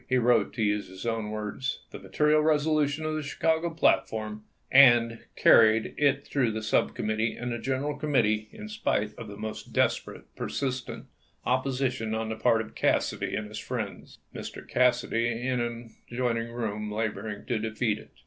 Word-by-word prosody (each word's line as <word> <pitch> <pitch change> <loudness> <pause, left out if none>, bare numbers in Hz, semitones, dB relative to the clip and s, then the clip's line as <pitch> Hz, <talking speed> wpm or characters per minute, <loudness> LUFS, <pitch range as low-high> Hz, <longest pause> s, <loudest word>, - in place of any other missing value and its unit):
He 130 - +3
wrote, 120 -3 +3
to 110 - -1
use 105 -1 0
his 95 +3 -10
own 115 -2 -1
words: 110 +5 -3
" - - -39
The - - -8
material 150 0 +2
resolution 155 -1 +1
of 155 - -1
the 155 - -2
Chicago 160 +3 0
platform, 110 -9 0 0.3
and 120 -3 +6 0.2
carried 110 0 +5
it 140 -1 +2
through 125 -6 0
the 110 0 -4
sub 110 - +1
committee 110 +1 -1
and 120 0 -4
the 120 - -3
gen 130 +2 -1
eral 145 0 -3
committee 110 -8 +1
in 210 0 -9
spite 210 - -1
of 115 - -8
the 100 0 -9
most 110 0 -7
desperate, - - 0
per - - -4
sistent 130 -2 -3 0.4
opposition 130 -3 0
on 110 0 -2
the 110 - -2
part 110 0 +3
of 110 - -9
Cassidy - - 0
and 110 - -3
his 105 0 -7
friends, - - -5 0.2
Mr. - - -8
Cassidy 120 -2 +2
himself 120 - -5
in 130 -1 0
an 120 -1 -5 0.2
adjoining 120 -2 -1
room 105 -3 -3
laboring 110 -1 -3
to 120 -3 -1
defeat 110 0 -1
it." - - -15
120 Hz, 180 wpm, -28 LUFS, 110-135 Hz, 0.4 s, and